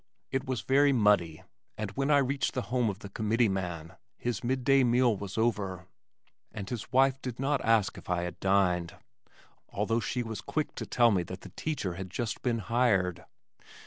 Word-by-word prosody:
It 135 0 -2
was 130 -3 -1
very 140 +2 +4
muddy, 105 - +2 0.3
and 105 -2 -3
when 135 +6 -1
I 145 - +6
reached 140 0 0
the 125 - -1
home 125 -3 +2
of 100 - -4
the - - -7
committeeman 95 -7 -1 0.2
his 120 0 -3
mid 130 +1 -1
day 135 +1 +5
meal 120 -1 +3
was 100 0 -7
over, 100 -6 -1 0.7
and 100 -3 -6
his 120 0 -5
wife 135 +1 +3
did 125 -2 -6
not 140 +1 0
ask 115 -3 +2
if - - -15
I 90 -1 0
had 90 -1 -6
dined 90 -3 +1 0.7
although 110 +3 0
she 120 +2 -2
was 110 -4 -5
quick 155 +8 -2
to - - -6
tell 120 -2 +4
me 95 -3 +2
that 90 +2 -7
the - - -10
teacher 145 - -2
had 95 +1 -6
just 115 +3 -3
been 120 -2 0
hired. 100 -5 +1
115 Hz, 185 wpm, -29 LUFS, 95-125 Hz, 0.7 s, I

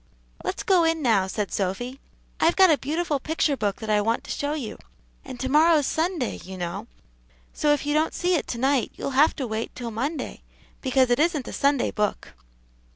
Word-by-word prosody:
"Let's - - -3
go 370 -3 +4
in 325 -1 +1
now," 210 -6 +3
said 200 +1 -3
Sophy; 245 +8 -3 0.4
"I've 335 +1 +3
got 375 -3 +6
a 300 - +4
beautiful 305 0 -1
picture 305 0 0
book 205 -5 -1
that 220 - -5
I 210 0 +3
want 225 +3 0
to - - -7
show 285 +1 -2
you; 260 -8 -6 0.4
and 260 -2 -9
to 260 - -2
morrow's 305 +1 +4
Sunday, 325 -4 -1
you 190 0 -9
know, 175 -1 -4 0.7
so 295 - +2
if 295 -1 +1
you 295 - 0
don't 310 +1 +1
see 360 +1 +1
it 330 - 0
to 235 - -4
night, 265 0 +1
you'll - - -4
have 285 +4 +4
to 270 - -3
wait 220 0 -4
till 240 -2 -5
Monday, 280 +8 -4 0.4
because 260 -2 +2
it 245 - +3
isn't 305 -5 +1
a - - -6
Sunday 280 -2 +1
book." 210 -1 -2
275 Hz, 205 wpm, -25 LUFS, 230-310 Hz, 0.7 s, got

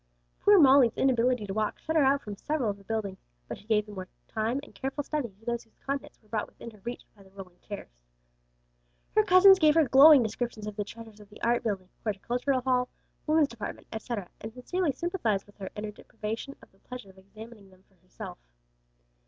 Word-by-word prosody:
Poor 410 0 +6
Molly's 270 - +6
inability 250 -3 +2
to 195 - -5
walk, 215 0 -1
shut 320 - -4
her 315 - +5
out 275 +1 +3
from 210 -2 -6
several 260 -1 -1
of 200 - -10
the - - -17
buildings, 200 -2 -3 0.3
but - - -5
she 210 - -20
gave 210 -2 +2
the 210 - -11
more 185 -2 -7 0.2
time 225 +4 -1
and - - -14
careful 270 +2 -4
study 295 -4 -2
to 200 +3 -24
those 235 0 -2
whose 225 - -33
contents 275 0 -4
were 215 - -28
brought 210 0 -2
within 235 - -11
her 215 - -18
reach 240 +1 -6
by 205 - -19
the 190 - -18
rolling 190 -2 -12
chairs. 205 - -8 1.2
Her 430 - +5
cousins 385 0 +7
gave 305 -3 +5
her 320 -4 +4
glowing 275 +2 +8
descriptions 220 -1 -4
of 210 -1 -6
the 205 - -2
treasures 225 0 -12
of 205 -1 -15
the 210 - -14
Art 235 +1 +2
building, 195 -4 -3
Horticultural 245 +5 -1
Hall, 250 -1 +1 0.4
Women's 310 -2 +4
Department, 225 -3 -7
etc., 220 -3 -4
and 220 - -6
sincerely 295 +8 -1
sympathized 260 - -1
with 205 - -21
her 190 -2 -6
in 210 - -5
her 215 - -4
deprivation 220 +5 -6
of - - -18
the 195 - -29
pleasure 250 -5 -10
of 190 - -20
examining 215 +1 -13
them 185 0 -22
for - - -33
herself. 185 - -10
230 Hz, 215 wpm, -28 LUFS, 205-270 Hz, 1.2 s, glowing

